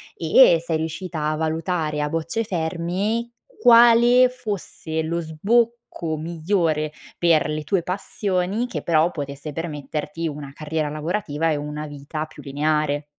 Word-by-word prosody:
e 165 +1 +5
sei 165 -1 0
riuscita 160 0 -4
a 155 - -1
valutare 160 -1 -1
a 150 - 0
bocce 165 +8 -2
ferme, 185 +5 -2 0.3
quale 240 +1 +7
fosse 205 -9 -4
lo 165 +2 -2
sbocco 195 0 0
migliore 160 -1 0 0.3
per 165 -3 +3
le 155 0 -3
tue 180 +5 +1
passioni, 190 +3 -1
che 245 - -5
però 165 0 +3
potesse 140 0 -6
permetterti 150 0 -4
una 145 -2 -6
carriera 155 0 -2
lavorativa 155 0 -2
e - - +1
una 150 +1 -5
vita 145 +2 -5
più 155 - -14
lineare. 150 +1 0
160 Hz, 130 wpm, -23 LUFS, 150-190 Hz, 0.3 s, quale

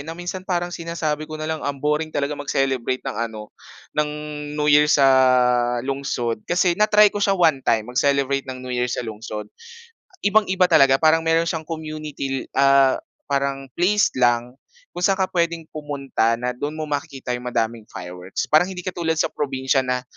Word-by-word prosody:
Na 160 +3 -7
minsan 175 +1 -5
parang 175 -1 -1
sinasabi 160 -3 -3
ko 155 - -6
na 155 - -5
lang 160 0 -3
ang 145 -1 -3
boring 150 +3 -1
talaga 145 -1 -2
mag-celebrate 135 -3 -1
ng 135 - -4
ano 105 -1 -10 0.4
ng 150 0 0 0.5
New 150 0 0
Year 150 +1 +6
sa 140 -2 +4 0.8
lungsod 130 -5 -2
kasi 175 0 +3
na-try 210 -1 +5
ko 205 - -3
siya 195 -1 +2
one-time 135 -10 +2
mag-celebrate 140 0 +1
ng 130 0 -7
New 125 - -5
Year 125 0 0
sa 120 - -3
lungsod. 110 -1 -6 0.8
Ibang-iba 195 -3 +3
talaga. 135 -2 +6
Parang 160 +3 +4
meron 165 0 +2
siyang 160 -2 -3
community, 155 -4 -5
ah, 135 -1 +5 0.3
parang 140 -1 -1
place 205 +5 +3
lang 120 0 +1 0.4
kung - - -7
saan 195 +2 +3
ka 190 - 0
pwedeng 170 -2 0
pumunta 140 -6 -1
na 125 +1 -2
do'n 145 +5 -5
mo 155 - -4
makikita 145 -3 -4
'yung 125 0 -4
madaming 115 -2 -2
fireworks. 90 0 -6
Parang 160 +4 +5
hindi 180 -2 -7
katulad 170 -3 -2
sa - - 0
probinsiya 135 -1 0
na 125 -1 -1
145 Hz, 170 wpm, -22 LUFS, 130-165 Hz, 0.8 s, Year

